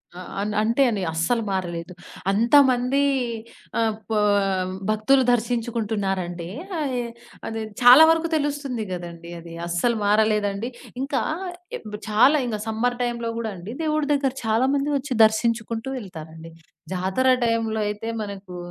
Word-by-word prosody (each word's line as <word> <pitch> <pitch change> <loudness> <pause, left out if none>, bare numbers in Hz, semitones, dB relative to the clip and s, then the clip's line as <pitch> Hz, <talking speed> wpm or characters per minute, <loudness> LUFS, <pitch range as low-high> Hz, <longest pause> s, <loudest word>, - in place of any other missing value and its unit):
అ - - -8 0.2
అన్ 210 +1 -2
అంతే 230 +5 +1
అండి, 210 -4 -2
అస్సలు 195 +9 +1
మారలేదు. 175 -2 -3 0.4
అంతమందీ 250 +4 +4 0.8
ఆహ్, 225 -2 +1 0.2
పా 215 - +2 0.7
భక్తులు 215 +5 +3
దర్శించుకుంటున్నారంటే, 215 -7 -1 0.3
అయె 255 -4 -1 0.4
అది 225 0 -4 0.2
చాలా 250 +5 +10
వరుకు 325 0 +2
తెలుస్తుంది 285 -5 -2
గదండీ 170 -1 -7
అది. 165 0 -11
అస్సలు 175 +8 +1
మారలేదండి. 210 +1 +2 0.3
ఇంకా 270 -1 -1 0.6
ఇబ్ 210 -1 -8
చాలా 230 +8 +5
ఇంగ 225 -3 -2
సమ్మర్ 240 +3 0
టైమ్‌లో 235 -1 -2
గూడా 225 -2 -3
అండి, 185 +6 -8
దేవుడు 305 -1 +1
దగ్గర 275 -2 +1
చాలా 220 +3 +2
మంది 280 +1 0
ఒచ్చి 270 0 -4
దర్శించుకుంటూ 225 +1 -1
వెళ్తారండి. 165 -6 -9 0.4
జాతర 190 +8 0 0.2
టైంలో 225 -1 0
అయితే, 210 +2 -4
మనకూ 200 -3 -7
225 Hz, 125 wpm, -23 LUFS, 195-245 Hz, 0.8 s, చాలా